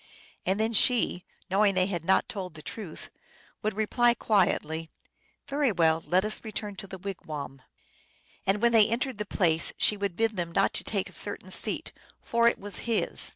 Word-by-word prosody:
And 190 +2 +1
then 220 +1 +1
she, 220 -5 +3 0.2
knowing 200 +1 +3
they 185 0 +3
had 175 -4 -3
not 190 +3 +2
told 185 -5 -6
the 155 - -11
truth, 195 -8 -8 0.5
would 215 -1 -2
reply 240 +3 +2
quietly, 165 -7 +1 0.3
" - - -41
Very 280 -3 +1
well, 165 -3 +2
let 185 +3 +2
us 215 - -3
return 210 -2 -5
to 195 - -7
the 190 - -8
wigwam! 155 -8 -7 0.4
" - - -33
And 200 +3 +1
when 235 - +5
they 220 -2 +5
entered 240 0 -2
the 210 - -2
place 165 -5 0
she 210 - +3
would 200 -3 -2
bid 225 0 0
them 170 -1 -3
not - - +2
to - - +1
take - - -2
a - - -14
certain - - 0
seat, - - +1 0.3
for 235 0 +2
it 235 - +3
was 200 -1 +1
his. 225 - 0
200 Hz, 195 wpm, -28 LUFS, 175-220 Hz, 0.5 s, when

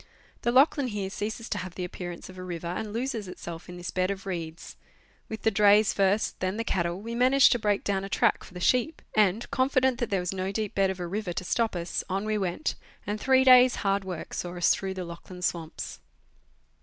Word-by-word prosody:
The 240 - +1
Lachlan 275 +1 +4
here 205 -4 -3
ceases 220 +3 -4
to 210 - -1
have 185 -1 -7
the 185 - -4
appear 180 0 -5
ance 170 - -9
of 185 - -12
a - - -6
river, 175 -2 -6
and 180 +5 -3
loses 230 -2 -3
itself 170 -2 -8
in 180 - -8
this 175 0 -5
bed 185 0 0
of 195 0 -4
reeds; 170 -3 -6 0.5
with 220 -2 -6
the 220 - +3
drays 210 0 +5
first, 200 +2 +1
then 185 +2 -1
the 230 - -1
cattle, 175 -4 -1
we 230 +3 -6
managed 255 +3 +5
to 240 - +2
break 205 -2 +1
down 195 -1 0
a 195 - -5
track - - +2
for 180 - -14
the - - -5
sheep, 255 - +1
and, 210 +1 +2
confident 260 -1 +2
that 240 - -1
there 195 - +1
was 180 +1 -2
no 190 0 -2
deep 210 0 -3
bed 195 -1 +2
of 190 -1 -4
a 175 - -3
river 190 +1 -3
to 185 - -4
stop 225 +3 0
us, 170 0 -2
on 195 +2 -1
we 215 0 0
'went, 190 - -1 0.3
and 210 +1 -3
three 260 0 +4
days' 255 -1 +7
hard 195 0 +2
work 180 -3 -6
saw 175 0 -4
us 175 - +4
through 190 -1 -4
the 185 -1 -4
Lachlau 170 +2 -10
swamps. 170 -3 -3
195 Hz, 230 wpm, -27 LUFS, 180-225 Hz, 0.5 s, days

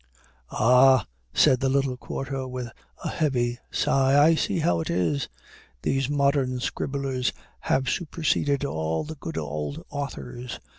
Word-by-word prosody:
"Ah," 125 +1 +5 0.3
said 130 - +4
the 135 - +1
little 135 -1 +1
quarto, 135 +1 -5
with 125 -2 -5 0.3
a - - -2
heavy 120 -5 0
sigh, 135 0 +2
"I - - +5
see 160 - 0
how 90 - +2
it 80 - -3
is; 85 -5 0 0.5
these 135 -1 0
modern 140 -3 +1
scribblers 135 0 -2 0.3
have 130 0 0
superseded 145 -2 0
all 80 - -1
the 155 - -6
good 160 +1 -7
old 75 -1 -4
authors. 125 - -5
130 Hz, 135 wpm, -26 LUFS, 120-140 Hz, 0.5 s, Ah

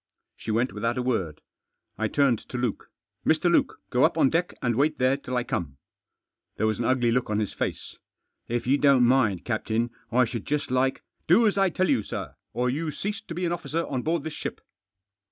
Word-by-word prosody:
She - - -9
went 115 +4 +1
without 115 +4 -1
a 125 - 0
word. 95 - -1 0.5
I 110 +2 -1
turned 135 -3 +2
to 125 - -4
Luke. 120 -4 -2 0.2
" - - -56
Mr. - - +3
Luke, - - +2
go - - +3
up - - +3
on 135 - +4
deck, 175 +2 0
and 120 -3 0
wait 150 +4 +2
there 130 +1 +3
till 130 -2 -4
I 125 - +1
come." 70 - -3 0.8
There - - +1
was 110 0 0
an 120 - -1
ugly 125 -2 +2
look 125 0 0
on 105 - 0
his 105 -2 -1
face. - - -4 0.2
" - - -53
If 120 0 -2
you 135 +3 +3
don't 140 -3 +5
mind, 120 -7 +3
captain, 115 0 -1 0.2
I 125 +1 +4
should 115 -2 -6
just 145 -3 -1
like 130 +1 +2
i) - - -28 0.2
" - - -46
Do 205 +8 +6
as 210 - +3
I 195 -1 +3
tell 185 +2 0
you, 110 - +3
sir - - -6 0.2
or 125 +1 0
you 155 +6 -1
cease 205 +8 -4
to 175 -7 -8
be 180 +1 -1
an 170 - 0
officer 170 -1 -2
on 130 -3 -2
board 160 +2 -1
this 160 -1 -5
ship." - - -5
125 Hz, 230 wpm, -26 LUFS, 115-150 Hz, 0.8 s, Do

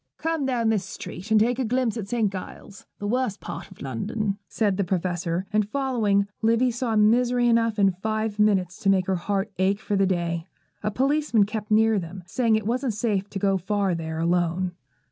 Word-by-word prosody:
'Come 320 -3 -1
down 235 -4 +1
this 215 -4 +1
street, 185 +3 -8
and 220 -1 +5
take 240 +3 +2
a - - +1
glimpse 245 -1 0
at 215 -4 -4
St. 220 -2 0
Giles's, 195 +1 -9
the 205 - -6
worst 240 -1 0
part - - -7
of 190 - -12
London,' 200 - -2
said 200 0 0
the 200 - +1
Professor; 175 -1 -1
and, 210 -1 +2
following, 225 -7 +1 0.2
Livy 230 +3 +3
saw 235 -1 -2
misery 240 +3 +3
enough 230 -1 +2
in 195 -2 +4
five 215 +3 -3
minutes 190 -4 +2
to 195 - +1
make 190 -2 +3
her 190 - 0
heart 200 +3 -2
ache 195 +2 +2
for 210 -1 -2
the 195 -1 +3
day. 170 -2 -1 0.3
A 210 - 0
policeman 270 0 +2
kept 210 +1 -4
near 220 0 +4
them, 180 +1 -8
saying 230 +4 +1
it 215 -1 -1
wasn't 245 0 -1
safe 205 -3 -1
to - - -5
go 195 -1 +1
far 195 0 0
there 160 -1 -4
alone. 175 +2 +1
210 Hz, 200 wpm, -25 LUFS, 190-230 Hz, 0.3 s, and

